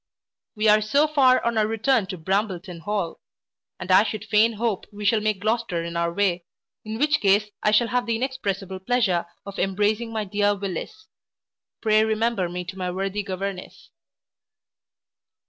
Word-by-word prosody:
We 215 +1 +1
are 210 0 +6
so 280 +9 +2
far 265 -5 +4
on 235 -1 +1
our 210 - +2
return 225 0 +1
to 185 - -5
Brambleton 190 0 -2
hall; 195 -2 -3 0.6
and 185 - -4
I 185 - +7
would 215 -1 -6
fain 215 +2 +3
hope 220 -2 -2
we 205 0 -7
shall 215 +1 +3
take 215 -2 0
Gloucester 215 -6 -1
in 170 0 -6
our 170 0 0
way, 180 -2 0 0.4
in 220 +1 -5
which 295 +3 +2
case 205 +1 +3
I - - +3
shall 230 +2 +3
have 245 0 0
the 230 - +1
inexpressible 200 -7 -3
pleasure 190 -5 +1 0.2
of 200 0 -7
embracing 210 +4 0
my 220 -1 -2
dear 205 +1 +1
Willis 200 - -6 0.8
Pray 215 -1 +4
remember 220 -4 0
me 180 0 -5
to 190 +1 -8
my 180 -1 -2
worthy 195 +3 -2
governess. 195 -1 -6
210 Hz, 165 wpm, -24 LUFS, 190-225 Hz, 0.8 s, I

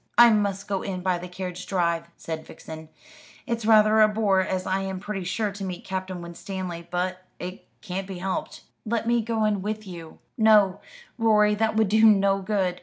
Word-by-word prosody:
"I 240 -1 +9
must 205 -2 0
go 195 -2 -1
in 185 -2 -4
by 180 -1 0
the 180 - -7
carriage 180 0 -6
drive," 170 -3 0
said 160 -1 -5
Vixen. 160 0 -10 0.6
"It's 230 -4 -2
rather 215 0 +6
a 215 - +8
bore, 210 -3 +2
as 185 0 -1
I 190 +1 0
am 190 -1 -4
pretty 205 -1 -4
sure 205 +4 -1
to 200 0 -7
meet 185 -2 -5
Captain 185 -2 -4
Winstanley. 170 0 -6
But 180 +1 -2
it 180 +1 -8
can't 190 +1 -4
be 190 -2 -6
helped." 185 +1 -4 0.2
"Let 230 +1 -2
me 235 0 +3
go 225 -1 0
in 205 -2 +1
with 215 +2 -4
you." 170 -4 -10 0.2
"No, 210 -4 +5 0.4
Rorie; 210 -2 +4
that 220 +1 0
would 220 -2 +3
do 220 +2 +3
no 200 -2 +5
good. 190 -3 -1
195 Hz, 190 wpm, -25 LUFS, 180-215 Hz, 0.6 s, I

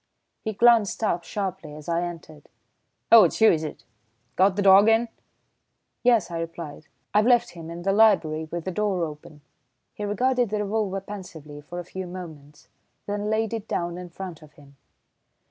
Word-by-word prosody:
He 220 - -3
glanced 230 -1 +3
up 175 -5 0
sharply 175 -6 -5
as 150 0 -11
I 170 0 0
entered. 165 -3 -8 0.6
"Oh, 230 -2 +10
it's 170 - -2
you, 220 -1 +7
is 160 -2 0
it? 155 - -7 0.5
Got 190 +1 +3
the 205 - 0
dog 195 +2 +7
in?" 225 +1 +2 0.9
"Yes," 235 -7 +3
I 165 - -3
replied, 165 -2 -7 0.3
"I've 210 +2 +3
left 240 -1 +3
him 165 -2 -10
in 170 +1 -7
the 195 - +1
library 175 -8 +3
with 170 0 -5
the 185 - -2
door 195 -2 -1
open." 150 -1 -11 0.5
He 210 - -7
regarded 245 +4 +1
the 210 0 -1
revolver 200 -2 -2
pensively 165 -7 -10
for 175 +4 -9
a 175 - -5
few 185 +1 -7
moments, 155 -5 -11 0.4
then 205 +1 -3
laid 220 0 0
it 225 -1 -5
down 175 0 -3
in 180 -1 -8
front 175 -2 -8
of 155 -1 -16
him. 140 -1 -19
185 Hz, 180 wpm, -25 LUFS, 165-210 Hz, 0.9 s, Oh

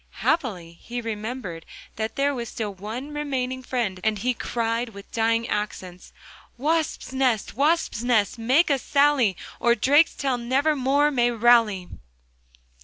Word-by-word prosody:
Happily, 180 - -1
he 245 +1 -5
remembered 215 -6 -5 0.3
that 220 +1 -3
there 285 +1 +1
was 235 -4 -5
still 210 -3 -4
one 225 +9 -7
remaining 260 -3 -2
friend, 235 -7 -2
and 220 -1 +1
he 250 +5 0
cried 230 0 -2
with 200 -2 -13
dying 230 0 +1
accents: 185 -4 -5 0.5
'Wasp's 310 0 -1
nest, 255 -5 0
Wasp's 295 -3 +1
nest, 230 -2 +1
make 265 +8 +3
a 275 - +2
sally, 280 - +2 0.2
Or 235 0 +3
Drakestail 275 +1 +2
nevermore 280 +3 +2
may 240 -3 +2
rally. 230 -5 +3
240 Hz, 130 wpm, -24 LUFS, 220-275 Hz, 0.5 s, make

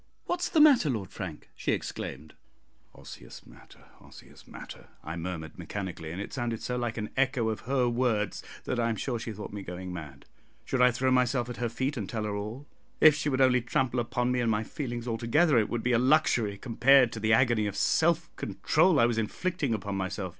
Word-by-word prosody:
what's 350 0 -1
the 320 - +2
matter, 280 - +6
Lord 110 -7 -3
Frank?" 90 -6 -8
she - - -1
exclaimed. 75 +3 -5 0.6
"Osseous - - -12
matter, - - -18
osseous - - -16
matter," - - -11 0.2
I 80 - -5
murmured 85 -2 -6
mechanically, 95 -5 -5
and 90 - -6
it 100 - -6
sounded 120 -3 -3
so 125 - -2
like 120 -2 -3
an 105 -1 -4
echo 130 -4 +1
of 110 - -3
her 130 -3 +2
words 120 -4 0 0.2
that 125 - -2
I 115 0 +1
am 115 - -1
sure 120 +2 -3
she 115 - -5
thought 105 -1 -8
me 105 - -5
going 90 0 -7
mad. 75 -5 -9 0.4
Should 130 - 0
I 125 - +7
throw 130 +2 0
myself 125 -1 +2
at - - -8
her 120 -1 -1
feet 130 +5 -2
and 100 -4 -4
tell 110 -2 -3
her 105 -1 -3
all? 110 +7 -6 0.3
If 155 - +8
she 145 0 -2
would 135 -1 0
only 125 -1 +4
trample 125 +1 0
upon 120 +1 -1
me 125 - +1
and 120 -1 +1
my 110 0 +1
feelings 120 -1 -5
together, 145 +4 +3
it 105 - 0
would 120 -1 -3
be 125 - +1
a 115 - +4
luxury 125 -6 +2
compared 130 +2 +4
to 115 - -6
the 110 0 +2
agony 115 -3 +3
of 100 - -4
self 170 +1 +1
control 160 0 +2
I 115 - +6
was 120 -1 0
inflicting 150 +5 -2
upon 100 -1 -4
myself. 95 0 -3
120 Hz, 210 wpm, -28 LUFS, 105-130 Hz, 0.6 s, If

